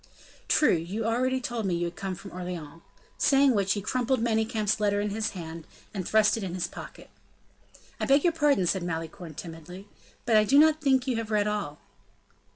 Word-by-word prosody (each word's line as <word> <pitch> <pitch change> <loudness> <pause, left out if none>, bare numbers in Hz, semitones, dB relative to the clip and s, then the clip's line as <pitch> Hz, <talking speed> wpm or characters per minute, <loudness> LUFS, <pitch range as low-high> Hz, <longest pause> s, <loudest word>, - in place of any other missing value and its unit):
"True, 300 - +4
you 180 +7 -2
already 255 +3 +1
told 240 -4 -3
me 180 - 0
you 175 0 -1
had 170 - -5
come 195 -2 -4
from 195 +2 -11
Orleans;" 175 -3 -7 0.4
saying 275 -2 +4
which 200 -3 +1
he 205 - -4
crumpled 255 +3 0
Manicamp's 220 -2 0
letter 205 -1 +1
in 205 0 -1
his 220 +1 -1
hand, 165 -1 -8 0.3
and 190 -4 -4
thrust 215 0 +3
it 220 - -4
in 180 -2 -4
his 180 - -1
pocket. - - -10 0.9
"I - - -1
beg 280 +1 +4
your 345 - +3
pardon," 295 - +2
said 190 +2 0
Malicorne, 165 -1 -5
timidly; 175 +4 -9 0.4
"but 230 - +2
I 215 - +6
do 270 +7 +3
not 310 +1 +5
think 265 -3 +2
you 255 -4 -1
have 225 -1 -4
read 210 -1 +2
all." 200 -9 -3
210 Hz, 195 wpm, -27 LUFS, 180-240 Hz, 0.9 s, I